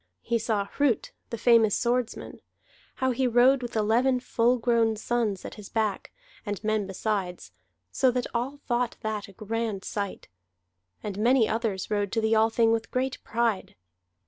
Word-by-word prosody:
He 235 -1 0
saw 215 -3 0
Hrut, 260 +2 0 0.2
the 230 - -4
famous 230 -2 +4
swordsman, 245 0 -2 0.5
how 260 0 +1
he 255 +1 +1
rode 250 +3 +5
with 240 -1 -6
eleven 235 +4 +2
full 245 0 +2
grown 230 -2 +2
sons 215 -3 -1
at - - -6
his 210 -2 -11
back, 215 -3 -1 0.3
and 205 -1 -5
men 215 -2 0
besides, 190 - -3 0.4
so 260 - +3
that 250 0 -1
all 250 +4 -2
thought 240 -1 0
that 220 -2 -3
a - - -13
grand 215 -1 -3
sight. 200 -2 -4 0.8
And 205 -1 -4
many 235 +1 +4
others 220 -4 -2
rode 205 -2 0
to 225 - +1
the 220 0 +1
Althing 225 +1 +3
with 225 0 -1
great 260 +1 -2
pride. 230 -3 -1
225 Hz, 160 wpm, -27 LUFS, 210-245 Hz, 0.8 s, rode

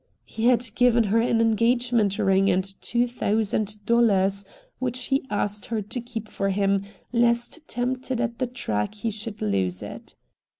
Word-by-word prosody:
He 225 - -4
had 240 -3 +2
given 245 -1 +4
her 215 +2 +2
an 230 -1 +1
engagement 230 -2 +2
ring 195 0 +3
and 185 0 +2 0.2
two 240 0 +1
thousand 210 -3 -1
dollars, 200 -4 +3 0.4
which 250 -1 -1
he 270 0 +1
asked 205 0 -1
her 225 -2 -1
to 235 +5 -5
keep 230 -2 -6
for 195 -1 -2
him, 195 0 +1 0.3
lest 235 +5 +2
tempted 255 0 -2
at 235 -1 -2
the 255 - 0
track 110 - -2
he 220 +2 -3
should 215 0 -5
lose 95 -3 0
it. - - -9
225 Hz, 160 wpm, -25 LUFS, 200-240 Hz, 0.4 s, given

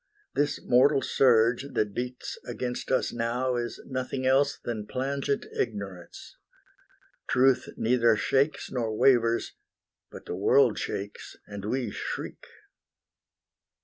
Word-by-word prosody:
This 145 0 0
mortal 135 +2 +4
surge 120 +1 +3
That 105 -2 0
beats 125 +2 -5
against 125 -1 -4
us 130 - +1
now 120 +2 -1
is 120 -1 -3
nothing 130 0 -3
else 140 +2 +3
Than 110 -3 -5
plangent 140 +1 -2
ignorance. 100 -5 -5 0.9
Truth 130 0 +3
neither 115 -1 +3
shakes 140 +6 0
Nor 115 -4 -2
wavers; 115 -3 +3 0.6
but - - -11
the - - -5
world - - +4
shakes, 100 +1 -5
and 100 -1 -8
we 120 0 -1
shriek. - - -6
125 Hz, 115 wpm, -27 LUFS, 115-130 Hz, 0.9 s, mortal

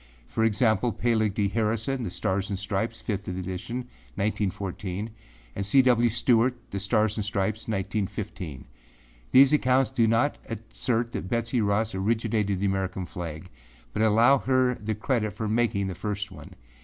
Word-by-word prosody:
See - - -27
for 110 - +1
example; 110 +1 +2
Peleg 110 -4 +1
D. 100 -2 +2
Harrison, 115 +5 -1
The 110 - -3
Stars 95 +3 -1
and 100 - -2
Stripes, 105 +3 -3
5th 100 -3 -2
edition, 95 +5 -4 0.4
1914., 100 0 -2 0.4
and - - -2
C. 130 +7 +5
W. 120 -2 +4
Stewart, 120 +2 +3 0.2
The 100 - -2
Stars 105 +1 +1
and 105 - -1
Stripes, 105 +1 -2
1915. 95 - -3 0.6
These 135 +2 +7
accounts 130 -2 +3
do 120 -4 +3
not 115 +6 +2
assert 115 +1 -2
that 95 - -5
Betsey 115 +1 0
Ross 105 +1 +1
originated 105 0 0
the 100 - 0
American 95 -1 -1
flag 85 -1 -6 0.5
but 105 - -1
allow 115 +5 +5
her 130 -1 +2
the 110 -2 -4
credit 110 -1 -1
of 110 -1 -1
making 110 -3 +1
the 95 - -3
first 100 +2 -4
one. 95 - -12
110 Hz, 155 wpm, -27 LUFS, 100-115 Hz, 0.6 s, These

